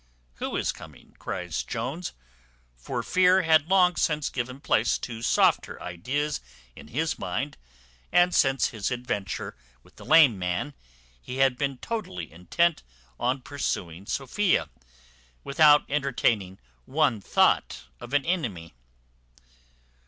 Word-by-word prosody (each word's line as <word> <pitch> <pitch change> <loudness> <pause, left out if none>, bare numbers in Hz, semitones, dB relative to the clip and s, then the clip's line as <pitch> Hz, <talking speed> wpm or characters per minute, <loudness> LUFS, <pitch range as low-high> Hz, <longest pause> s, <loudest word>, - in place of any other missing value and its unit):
"Who - - -4
is - - 0
coming?" 75 -4 -14
cries - - -3
Jones; 135 +10 -4 0.6
for - - -4
fear 185 +1 +4
had 160 -1 +4
long 180 -2 +4
since 150 -2 0
given 125 +1 -4
place 115 -5 +2
to 115 -2 -7
softer - - +2
ideas 130 - -3 0.3
in - - -12
his - - -2
mind; - - -3 0.6
and 175 0 +4
since 135 -1 +3
his 110 -5 -3
adventure 120 -6 -4 0.3
with - - -23
the - - -11
lame 150 -10 +6
man, 90 +11 -2 0.5
he 125 - -7
had 135 -1 +3
been 135 0 -2
totally 125 - -5
intent 120 - +1 0.4
on 125 +2 0
pursuing 95 - -4
Sophia, 175 +9 0 0.7
without 150 +1 +5
entertaining 120 -9 0 0.3
one 135 -5 +1
thought 95 - +2 0.2
of 120 - -10
an 145 - +2
enemy. 115 - -2
135 Hz, 125 wpm, -26 LUFS, 105-155 Hz, 0.7 s, lame